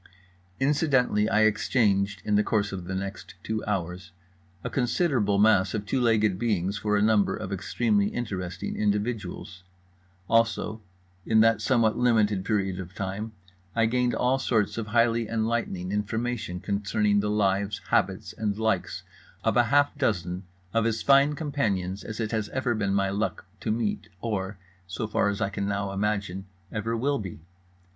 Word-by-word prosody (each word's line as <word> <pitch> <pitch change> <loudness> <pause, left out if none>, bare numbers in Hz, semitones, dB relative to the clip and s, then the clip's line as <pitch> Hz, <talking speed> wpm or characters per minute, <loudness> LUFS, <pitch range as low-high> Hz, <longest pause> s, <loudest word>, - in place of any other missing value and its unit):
Incidentally, 135 -7 +2
I 110 - +3
exchanged 105 -2 +2
(in 105 - 0
the 105 - +5
course 105 -1 0
of 95 -3 -5
the 95 - -4
next 100 -1 -6
two 110 0 -2
hours) 90 -3 -3 0.5
a - - -3
considerable 120 - +1
mass 100 -2 +4
of 105 -1 -3
two 130 +4 0
legged 110 -5 +2
beings 100 -4 0
for 105 -1 +1
a 100 - +2
number 110 -2 +3
of 100 -3 -5
extremely 100 +1 +1
interesting 95 -6 -4
individuals. 105 -3 -2 0.6
Also, 115 -1 +1 0.4
in 110 +2 +4
that 115 0 +4
somewhat 115 -4 +2
limited 110 -5 +3
period 95 -3 -1
of 95 +1 -8
time, 100 +3 -4 0.4
I 115 -1 +3
gained 125 +2 +1
all 130 +2 +2
sorts 115 -3 0
of 110 - -4
highly 115 0 +2
enlightening 110 -5 -1
information 105 -2 -2
concerning 105 +1 +1
the 105 +1 0
lives, 100 -1 +1
habits - - 0
and 105 -2 -2
likes 110 -4 -1 0.4
of - - +1
half 140 +5 +3
a - - -19
dozen 90 - -1 0.3
of 115 0 +2
as 115 -1 -1
fine 140 +1 +5
companions 100 - -2
as 110 +1 -7
it 110 -2 -2
has 110 -2 -1
ever 130 -2 0
been 100 -3 0
my 100 -1 +1
luck 105 +2 -2
to - - -4
meet 120 - -1
or, 100 -2 -3 0.3
so 95 +4 -3
far 105 -1 +1
as 100 +1 -3
I 110 - +1
can 100 0 -3
now 100 -1 -1
imagine, 100 -1 -2 0.2
ever 115 +2 -2
will 140 +4 0
be. 95 -6 -7
105 Hz, 160 wpm, -27 LUFS, 100-115 Hz, 0.6 s, the